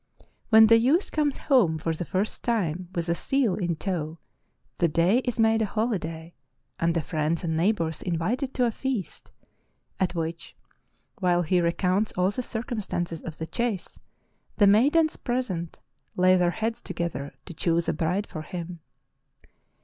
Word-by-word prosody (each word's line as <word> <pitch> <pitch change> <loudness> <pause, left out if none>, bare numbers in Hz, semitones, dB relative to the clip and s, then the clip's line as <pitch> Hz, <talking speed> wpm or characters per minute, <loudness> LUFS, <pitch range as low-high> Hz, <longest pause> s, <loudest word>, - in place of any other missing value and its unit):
When 220 -1 +8
the 230 +1 +6
youth 285 - +2
comes 295 -3 0
home 215 - +3
for 160 +1 -2
the 165 +2 -4
first 190 +5 -2
time 185 -7 -1
with 170 -1 -2
a 170 - +2
seal 250 +3 +1
in 175 -4 -1
tow 160 -2 -3 0.6
the 170 - +4
day 170 +8 +3
is 245 -3 -3
made 225 0 +4
a 215 - +1
holiday 175 -7 -3 0.5
and 165 0 +1
the 165 - 0
friends 155 +3 -1
and 160 -2 -1
neighbors 165 -3 0
invited 205 - -1
to 250 - +3
a 235 - +1
feast, 250 -5 -4 0.7
at 185 -1 0
which, 165 0 -4 0.6
while 175 -2 +2
he 175 +2 +2
re 170 0 +2
counts 190 +4 +1
all 180 +2 +1
the 255 - -3
circumstances 215 - -4
of 160 -2 -7
the 160 - -4
chase, 205 +3 -3 0.6
the 205 - +6
maidens 285 +11 +4
present 205 -10 -3 0.4
lay 185 0 +5
their 180 -1 +3
heads 220 +6 -2
together 145 -5 -4
to 175 - -8
choose 170 +1 0
a - - +1
bride 180 +5 -1
for 155 - -7
him. 175 +1 -7
180 Hz, 165 wpm, -26 LUFS, 165-225 Hz, 0.7 s, When